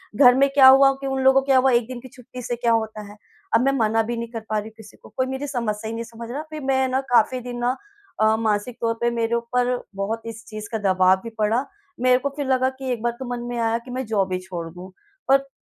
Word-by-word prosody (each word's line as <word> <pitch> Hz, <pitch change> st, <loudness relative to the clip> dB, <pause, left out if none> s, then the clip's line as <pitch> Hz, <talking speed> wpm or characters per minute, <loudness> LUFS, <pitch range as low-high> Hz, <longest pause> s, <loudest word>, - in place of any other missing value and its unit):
घर 250 Hz, 0 st, +7 dB
में 275 Hz, +1 st, +4 dB
क्या 265 Hz, -2 st, +8 dB
हुआ 270 Hz, +1 st, +8 dB
कि 275 Hz, -, -3 dB
उन 270 Hz, 0 st, -1 dB
लोगों 265 Hz, 0 st, +5 dB
को 270 Hz, -, -11 dB
क्या 270 Hz, -2 st, +4 dB
हुआ 260 Hz, 0 st, +4 dB
1 235 Hz, -1 st, +2 dB
दिन 255 Hz, -1 st, -7 dB
की 260 Hz, -, -11 dB
छुट्टी 250 Hz, 0 st, -10 dB
से 240 Hz, 0 st, -3 dB
क्या 235 Hz, -1 st, 0 dB
होता 220 Hz, -1 st, -1 dB
है? 210 Hz, -, -15 dB, 0.4 s
अब 225 Hz, -, +5 dB
मैं 275 Hz, -, +4 dB
मना 225 Hz, 0 st, +2 dB
भी 235 Hz, +1 st, -4 dB
नहीं 235 Hz, 0 st, -4 dB
कर 230 Hz, -, -4 dB
पा 215 Hz, -, 0 dB
रही 210 Hz, +1 st, -3 dB
हूँ 220 Hz, -, -23 dB
किसी 215 Hz, -2 st, -14 dB
को। -, -, -16 dB
कोई 260 Hz, -, +2 dB
मेरी 265 Hz, +2 st, -4 dB
समस्या 220 Hz, -5 st, -3 dB
ही -, -, -5 dB
नहीं 230 Hz, -, -4 dB
समझ 230 Hz, 0 st, -10 dB
रहा। 285 Hz, -, -3 dB
फिर 310 Hz, -1 st, -7 dB
मैं 265 Hz, -1 st, +1 dB
न 265 Hz, -, +2 dB
काफ़ी 245 Hz, +2 st, +3 dB
दिन 245 Hz, 0 st, -6 dB
ना 245 Hz, +2 st, 0 dB, 0.5 s
अ, 220 Hz, 0 st, +4 dB
मानसिक 220 Hz, +2 st, -1 dB
तौर 230 Hz, 0 st, +1 dB
पे 240 Hz, -, +2 dB
मेरे 230 Hz, 0 st, 0 dB
ऊपर 245 Hz, +1 st, 0 dB, 0.2 s
बहुत 215 Hz, +3 st, -3 dB
इस 225 Hz, 0 st, -8 dB
चीज़ 215 Hz, -1 st, -8 dB
का 225 Hz, -, -1 dB, 0.2 s
दबाव 185 Hz, 0 st, +4 dB
भी 230 Hz, -, -6 dB
पड़ा। 225 Hz, +6 st, +1 dB, 0.4 s
मेरे 255 Hz, 0 st, +5 dB
को 280 Hz, -, -2 dB
फिर 285 Hz, -, -2 dB
लगा 260 Hz, 0 st, +2 dB
कि 265 Hz, -1 st, -3 dB
एक 235 Hz, -3 st, -3 dB
बार 240 Hz, 0 st, 0 dB
तो 260 Hz, -, -5 dB
मन 240 Hz, -, -6 dB
में 240 Hz, -, -4 dB
आया 230 Hz, 0 st, +1 dB
कि 255 Hz, -, -9 dB
मैं 255 Hz, +1 st, -3 dB
जॉब 195 Hz, -4 st, 0 dB
ही 185 Hz, -, -1 dB
छोड़ 180 Hz, -3 st, -6 dB
दूँ। 180 Hz, +1 st, -10 dB, 0.4 s
पर 275 Hz, 0 st, +3 dB
235 Hz, 280 wpm, -23 LUFS, 220-260 Hz, 0.5 s, क्या